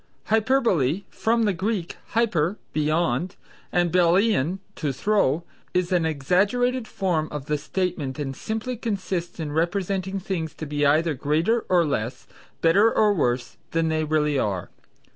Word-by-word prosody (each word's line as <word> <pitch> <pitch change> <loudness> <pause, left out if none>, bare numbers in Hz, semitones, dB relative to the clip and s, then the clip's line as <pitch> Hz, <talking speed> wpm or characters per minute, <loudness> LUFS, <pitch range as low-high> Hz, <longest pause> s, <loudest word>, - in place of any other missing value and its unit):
Hyperbole 215 - +2
(from 230 +1 +1
the 205 -2 +2
Greek 190 0 -2 0.2
hyper, 205 -5 +2 0.2
beyond, 155 +2 0 0.4
and 175 -1 +2
ballein, 180 -1 +3 0.2
to 150 -4 -1
throw), 170 0 +1 0.3
is 180 0 +1
an 175 -3 +2
exaggerated 205 - +1
form 170 -5 -1
of 150 -2 -6
statement 155 -4 -2
and 135 -3 -4
simply 220 - -4
consists 190 -7 -3
in 155 -2 -3
representing 190 +4 -1
things 175 -4 -4
to 155 - -6
be 145 0 +1
either 155 +3 +3
greater 160 - +1
or 175 -2 +4
less, 125 -4 -3 0.4
better 200 +7 +5
or 210 -1 +3
worse 125 -8 -1 0.2
than 165 0 +1
they 155 0 0
really 150 -2 +1
are. 95 -6 -2
175 Hz, 140 wpm, -24 LUFS, 150-200 Hz, 0.4 s, better